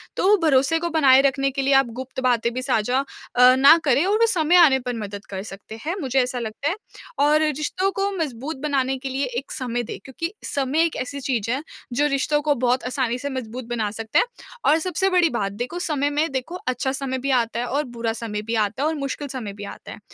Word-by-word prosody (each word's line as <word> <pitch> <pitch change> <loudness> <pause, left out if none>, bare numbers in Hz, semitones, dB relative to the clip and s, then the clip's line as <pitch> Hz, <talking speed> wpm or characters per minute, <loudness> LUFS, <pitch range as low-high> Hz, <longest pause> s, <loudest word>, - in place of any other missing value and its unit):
तो - - +1
वो 420 - +7
भरोसे 285 +1 +3
को 340 +1 -2
बनाए 275 -5 +5
रखने 275 0 +1
के 275 +1 -2
लिए 275 +1 +2
आप 270 -2 +5
गुप्त 260 0 -6
बातें 235 -2 +2
भी 255 - -3
साझा 250 -1 +1 0.4
अ, 250 +1 +7
ना 275 +5 +7
करें 280 +1 +3
और 405 +3 +2
वो 460 - +6
समय 345 -5 +3
आने 310 -7 +7
पर 250 -1 -4
मदद 205 -1 -6
कर 190 -1 -5
सकता 205 +1 -10
हैं, 345 - 0
मुझे 265 -2 +1
ऐसा 250 0 -2
लगता 230 +5 -3
है 350 - -1 0.4
और 300 +2 +4
रिश्तों 310 +6 0
को 390 +1 -1
मजबूत 285 -2 -4
बनाने 270 -3 0
के 265 +1 -6
लिए 270 +1 -1
एक 275 - -12
समय 245 -2 -2
दें - - -6
क्योंकि 330 - -5
समय 280 +3 +1
एक 330 - -3
ऐसी 280 +2 -5
चीज़ 235 -5 -1
है 265 +3 -1 0.3
जो 290 +4 +2
रिश्तों 295 +1 +1
को 290 - +4
बहुत 250 +1 +2
आसानी 250 -2 -1
से 285 - -4
मजबूत 255 -2 -5
बना 225 -3 -1
सकता 220 +1 0
है - - +3 0.4
और 310 +3 +5
सबसे 370 +3 0
बड़ी 360 -3 +3
बात, 205 -7 -2
देखो 245 +11 -4
समय 295 -5 0
में 300 +3 0
देखो, 265 +6 -4
अच्छा 255 +1 0
समय 265 -1 -3
भी 275 +2 -1
आता 235 -2 +1
है 245 - -1
और 285 +4 0
बुरा 230 -1 -1
समय 220 -2 -4
भी 230 - -1
आता 215 +4 0
है 305 - +2
और 320 - -2
मुश्किल 285 0 -4
समय 240 -6 -5
भी 205 +1 -9
आता - - -10
है। - - -9
265 Hz, 240 wpm, -23 LUFS, 240-300 Hz, 0.4 s, वो